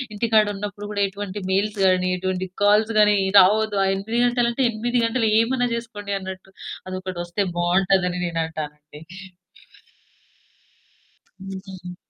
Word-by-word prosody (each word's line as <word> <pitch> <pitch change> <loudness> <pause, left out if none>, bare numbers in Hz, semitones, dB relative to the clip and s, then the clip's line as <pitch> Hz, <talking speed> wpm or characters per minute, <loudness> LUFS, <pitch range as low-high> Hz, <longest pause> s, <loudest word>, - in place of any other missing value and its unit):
ఇంటికాడ 220 0 +3
ఉన్నప్పుడు 205 +1 -6
గూడా 205 -1 0
ఎటువంటి 200 +1 -6
మెయిల్స్ 205 +2 0
గాని, 185 -1 +3
ఎటువంటి 185 0 -2 0.2
కాల్స్ 210 +2 +4
గాని, 210 0 +5 0.2
రావద్దు. 210 +2 +3
ఆ - - +1
8 220 +5 -2
గంటలంటే 240 +1 +1
8 240 +3 -2
గంటలు 230 -1 +1
ఏమన్నా 245 +2 +1
జేసుకోండి 210 -4 -6
అన్నట్టు 190 0 -8 0.4
అదొకటొస్తే 185 0 -4 0.2
బావుంటదని 180 +1 +2
నేనంటానండి. 155 -3 -5 2.4
అవునా! 190 -2 -8
195 Hz, 110 wpm, -22 LUFS, 185-215 Hz, 2.4 s, గాని